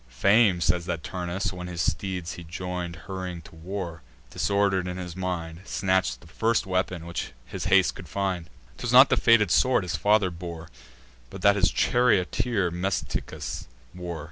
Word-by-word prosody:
Fame 100 - +4
says 85 0 +1
that 85 -4 -3
Turnus, 90 +1 -3
when 90 -1 -6
his 85 -2 -6
steeds 90 +1 -2
he 85 - -9
join'd, 90 0 -5
Hurrying 90 -3 -5
to - - -15
war, 85 0 -6 0.3
disorder'd 100 -2 +1
in 90 0 -4
his 90 -2 -6
mind, 85 -3 -4
Snatch'd 95 -14 0
the - - -16
first 115 +8 +1
weapon 90 -2 -1
which 85 -6 -5
his - - -6
haste 95 -1 +4
could 85 -3 -11
find. 95 -3 -2 0.3
'Twas - - -2
not - - +9
the - - +6
fated 110 -5 +4
sword 130 +2 +4
his 90 -2 -2
father 100 +3 +3
bore, 85 -1 -8 0.6
But 95 - -9
that 100 0 +6
his 95 -2 +3
charioteer 110 -4 +2
Metiscus 90 +2 -3 0.3
wore. 90 -2 -6
90 Hz, 165 wpm, -26 LUFS, 85-95 Hz, 0.6 s, not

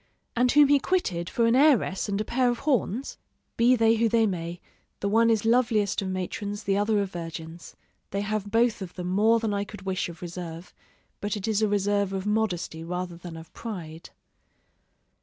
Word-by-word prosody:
and 245 +1 +3
whom 295 0 +7
he 285 0 +5
quitted 185 - -1
for 235 - +1
an 230 +1 +4
heiress 260 -9 +3
and 200 0 -1
a 215 - -1
pair 250 +2 +2
of 240 - -1
horns? 260 -3 0 0.4
Be 240 +2 +5
they 225 -1 +3
who 230 0 +2
they 225 0 +3
may, 175 -3 -3 0.4
the 200 - -1
one 225 +3 +4
is 225 -1 +2
loveliest 225 -4 +2
of 195 - -3
matrons, 200 +2 -4
the 195 - +1
other 205 +1 +2
of 195 - -6
virgins: 165 -1 -8 0.3
they 200 - -2
have 205 0 -2
both 230 0 +2
of 180 -2 -7
them 180 -1 -4
more 220 +5 +4
than 220 -2 -1
I 200 0 0
could 205 0 -10
wish 190 -2 -2
of 170 0 -10
reserve, 175 -1 -7 0.5
but 205 +1 -2
it 205 +1 -5
is 220 -1 +1
a 215 - +3
reserve 200 -1 +1
of 190 0 -3
modesty 210 -6 -1
rather 180 +1 -4
than 170 -1 -9
of 160 0 -12
pride. 170 -8 -7
205 Hz, 195 wpm, -26 LUFS, 180-225 Hz, 0.5 s, whom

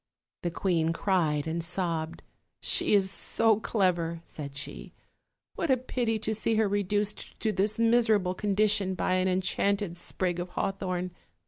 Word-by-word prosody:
The 175 - -1
queen 165 -2 +1
cried 165 -6 +1
and 165 +1 -2
sobbed: 170 -2 -2 0.4
"She - - +3
is 190 -1 +3
so 220 +1 +2
clever," 175 -6 0
said 140 -2 -8
she, 145 - -7 0.6
"what 330 - -2
a 260 - +5
pity 240 -3 -1
to 220 0 -2
see 220 +1 +1
her 220 -1 +3
reduced 205 +1 -1
to 220 - +1
this 205 +2 +1
miserable 225 -5 +3
condition 200 -1 +1
by 185 - 0
an 185 0 +2
enchanted 190 0 0
sprig 175 0 -2
of 175 +1 -4
haw 195 - -1
thorn! 185 -2 -3
190 Hz, 150 wpm, -28 LUFS, 175-210 Hz, 0.6 s, a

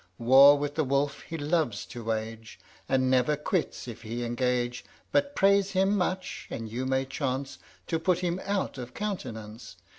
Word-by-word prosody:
War 135 +4 +8
with 145 0 -2
the 155 - +1
wolf 140 +1 0
he 165 - -6
loves 145 - 0
to 120 -1 -8
wage, 110 -1 -4 0.3
And 130 -1 +2
never 130 +3 +3
quits 155 -2 -2
if 120 -1 -8
he 120 +2 -4
engage; 120 0 -1 0.3
But 285 0 +1
praise 200 0 +3
him 195 +2 +3
much, 185 -1 -2
and 115 -1 -5
you 125 +4 -3
may 130 0 +1
chance 135 0 -3 0.3
To 165 - -1
put 175 +1 +2
him 180 0 -2
out 195 -8 -2
of 125 0 -8
countenance. 115 - -5
135 Hz, 170 wpm, -28 LUFS, 120-175 Hz, 0.3 s, War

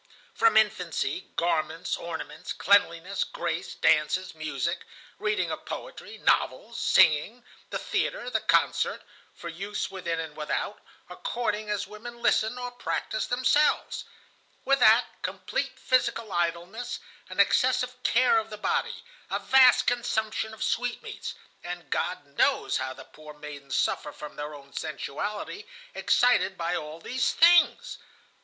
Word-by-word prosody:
From 455 - +4
infancy 180 -6 0
garments, 165 0 0
ornaments, 170 -1 -6
cleanliness, 195 -1 +2
grace, - - -4
dances, 160 +4 +2
music, 155 0 -2 0.4
reading 420 0 0
of - - -5
poetry, - - -7
novels, - - +1
singing, 170 +11 +4 0.3
the - - -2
theatre, - - -2
the - - +2
concert, - - +2 0.3
for - - -8
use 195 +5 -4
within 180 -3 -3
and 160 -2 -5
without, 150 -1 -3 0.3
according 215 - -3
as 205 -1 -1
women 225 +4 -10
listen, 220 0 +2
or 245 0 -4
practice 230 -2 -3
themselves. 255 +4 +2 0.6
With 275 0 +3
that, 230 +1 +6 0.2
complete - - -3
physical 240 -4 +1
idleness, 175 +8 -2 0.3
an - - -7
excessive 250 0 +3
care 245 -2 +4
of 220 0 -6
the 210 - -7
body, 460 - -1 0.3
a - - 0
vast 260 -1 +6
consumption 220 -2 -1
of 220 - -6
sweetmeats; 245 -1 -3 0.3
and 175 -4 -7
God 180 -2 -1
knows - - +3
how 130 0 -3
the - - -11
poor 150 -1 -13
maidens 145 -2 -7
suffer 150 - 0
from 150 0 -9
their 150 0 -6
own 140 -1 -14
sensuality, 205 - -4 0.3
excited 245 -6 +3
by 170 +1 -1
all 155 0 -5
these 250 +9 0
things. 345 +1 +5
200 Hz, 130 wpm, -27 LUFS, 165-245 Hz, 0.6 s, that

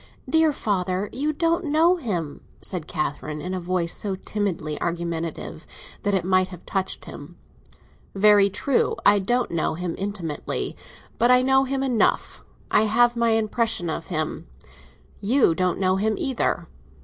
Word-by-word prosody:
"Dear 320 -1 +4
father, 195 -6 -1
you 290 +5 0
don't 335 +3 0
know 320 +4 +4
him," 175 - -4 0.2
said 175 -5 -4
Catherine, 150 0 -3
in 180 +4 -4
a 185 - -2
voice 175 -1 -1
so 200 -2 -2
timidly 185 -6 -3
argumentative 170 -1 -4 0.3
that 205 -1 +1
it 180 -3 0
might 185 0 +3
have 180 -2 -12
touched 190 -1 -2
him. - - -10 0.8
"Very 200 0 +6
true; 260 +6 0
I 205 0 +6
don't 240 +6 0
know 165 -1 0
him 175 0 -3
intimately. 190 -6 -3 0.4
But 240 - +4
I 250 0 +6
know 265 +1 +4
him 270 0 -1
enough. 250 -4 +1 0.3
I 215 - +4
have 240 +3 +3
my 235 -1 +2
impression 220 -5 0
of 165 - -4
him. 155 - -3 0.7
You 230 -2 +3
don't 180 +2 0
know 185 0 +2
him 215 +2 +1
either." 265 -3 -1
200 Hz, 150 wpm, -24 LUFS, 175-240 Hz, 0.8 s, Very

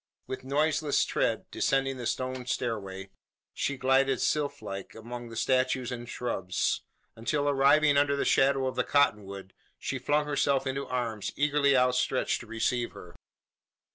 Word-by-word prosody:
With 130 - -6
noiseless 150 +2 +1
tread - - 0
descending 135 -1 0
the 120 -2 -4
stone 130 0 -3
stairway, 100 -6 -3 0.4
she 140 - -2
glided 135 +1 +2
sylph 145 -6 -1
like 95 -2 -7
among 120 +2 -8
the 115 - -9
statues 130 +1 +1
and 120 -1 -6
shrubs; 95 -7 -1 0.3
until, 145 +6 -1
arriving 145 +1 +4
under 140 0 +3
the 140 - -1
shadow 135 0 +3
of 130 - -2
the - - +1
cotton 135 -8 +2
wood, 95 -1 -9 0.2
she 135 - -4
flung 145 +4 +1
herself 140 -2 +1
into 135 +1 -3
arms 115 -5 -2
eagerly 140 -1 +3
outstretched 125 +1 +1
to 120 - -11
receive 120 +2 -1
her. 90 - -12
130 Hz, 150 wpm, -29 LUFS, 120-140 Hz, 0.4 s, arriving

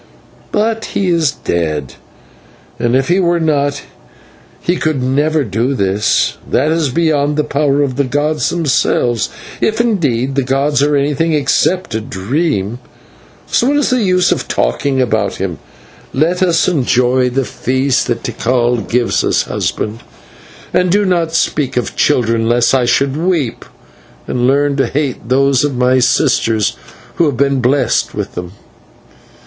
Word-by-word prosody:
But 225 +1 0
he 195 -2 +1
is 165 -4 +2
dead, 75 - -3 0.9
and 120 +1 +1
if 130 0 +1
he 180 +2 +2
were 175 -2 +2
not 145 -3 0 0.8
he 175 - 0
could 155 -4 -1
never 145 +4 +1
do 120 +5 -1
this; 100 0 0
that 145 +5 +1
is 160 -3 +1
beyond 150 -1 +1
the 150 - +2
power 145 -1 +1
of 130 -2 -3
the 140 - +2
gods 145 +4 0
themselves, 130 -7 0 0.3
if 220 +1 0
indeed 145 - 0
the 135 - +1
gods 135 +2 0
are 145 +1 +2
anything 145 +3 0 0.4
but 185 -10 -11
a 110 - -1
dream. 120 - -2 0.7
So 240 - +1
what 290 +1 +2
is 290 - +1
the 255 -1 +2
use 185 -3 +2
of - - -1
talking 105 - 0
about 125 -3 0
him; - - -4 0.5
let 165 +7 +1
me 185 - +3 0.2
enjoy 125 -5 +2
the 130 +1 -1
feast 130 +2 0
that 115 -1 -2
Tikal 120 0 0
gives 120 +2 0
us, - - +1
husband, 110 +2 -3 0.7
and 180 - +2
do 205 +2 +3
not 170 -3 0
speak 140 -4 0
of 125 - -2
children, 115 -5 +1
lest 120 +1 +2
I 130 -2 +3
should 135 +3 +1
weep, 160 -6 -1 0.6
and 125 0 0
learn 140 +1 +2
to 135 - +1
hate 135 -5 -3
those 135 +1 +3
of 140 -4 -1
my 130 +1 +3
sisters 115 -5 +1 0.4
who 170 - +3
have 140 -4 -2
been 140 0 +1
blest 135 +3 +1
with - - -4
them." 90 0 -7
140 Hz, 155 wpm, -15 LUFS, 125-155 Hz, 0.9 s, me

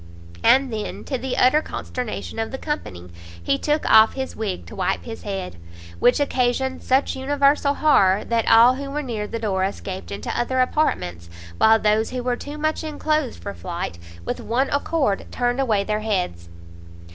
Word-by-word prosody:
And 260 - +4
then, 215 -1 -5
to 265 -3 -3
the 260 0 -3
utter 255 +5 +4
consternation 250 -6 -5
of 225 - -2
the 265 - -5
company, 90 - -5 0.3
he 140 - +1
took 300 +1 0
off 220 0 +7
his 265 -1 -4
wig 205 -5 -4
to - - -11
wipe 185 -2 -1
his 225 -1 -8
head! 190 - -5 0.4
which 245 +3 +4
occasioned 260 -1 0
such 265 +2 +1
universal 280 +1 +2
horror, 200 -10 +4
that 230 -1 0
all 235 +3 +7
who 275 +1 -6
were 295 +2 -3
near 220 -5 -4
the 230 - -4
door 200 -4 -1
escaped 190 -1 -4
into 100 +1 -4
other, 255 +2 0
apartments, 90 - 0 0.3
while 220 0 +6
those 215 0 +1
who 250 -1 -4
were 250 0 0
too 290 +4 -8
much 310 +1 -1
enclosed, 305 -3 -2
for 200 - -5
flight, 170 - -5 0.3
with - - -3
one 255 +4 0
accord 285 -7 0
turned 245 +1 -1
away 215 -6 +1
their 210 +1 -1
heads. 180 - -2
240 Hz, 175 wpm, -22 LUFS, 200-270 Hz, 0.4 s, off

